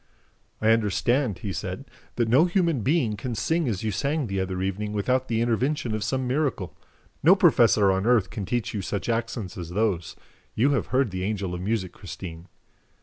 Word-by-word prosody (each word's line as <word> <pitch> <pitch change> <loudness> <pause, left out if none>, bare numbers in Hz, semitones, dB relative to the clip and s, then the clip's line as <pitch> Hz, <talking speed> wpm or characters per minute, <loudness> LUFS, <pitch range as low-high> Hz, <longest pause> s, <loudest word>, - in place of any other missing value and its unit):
"I 110 - +2
understand," 115 +1 +1
he 100 -4 -5
said, - - -5 0.3
"that 120 -2 +1
no 130 +9 +5
human 170 - +1
being 130 -4 +1
can 120 +3 -4
sing 160 +9 0
as 100 -3 -3
you 110 - 0
sang 140 +8 -1
the 95 -3 -2
other 95 -1 -2
evening 105 +2 -3
without 125 +5 0
the 115 -1 0
intervention 120 +2 0
of 110 -1 -2
some 130 +4 -1
miracle. 130 - -1 0.5
No 175 +6 +7
professor 120 - +5
on 95 +3 0
earth 115 -6 +3
can 105 -4 -5
teach 120 +1 -2
you 105 - -2
such 100 +3 -3
accents 115 -5 -2
as 85 -2 -6
those. 90 -3 -1 0.4
You 130 +6 +3
have 140 - 0
heard 130 -4 +1
the 90 0 -4
Angel 100 -3 -2
of 90 - -4
Music, 95 -2 -1
Christine." 85 -3 -9
110 Hz, 190 wpm, -25 LUFS, 95-130 Hz, 0.5 s, No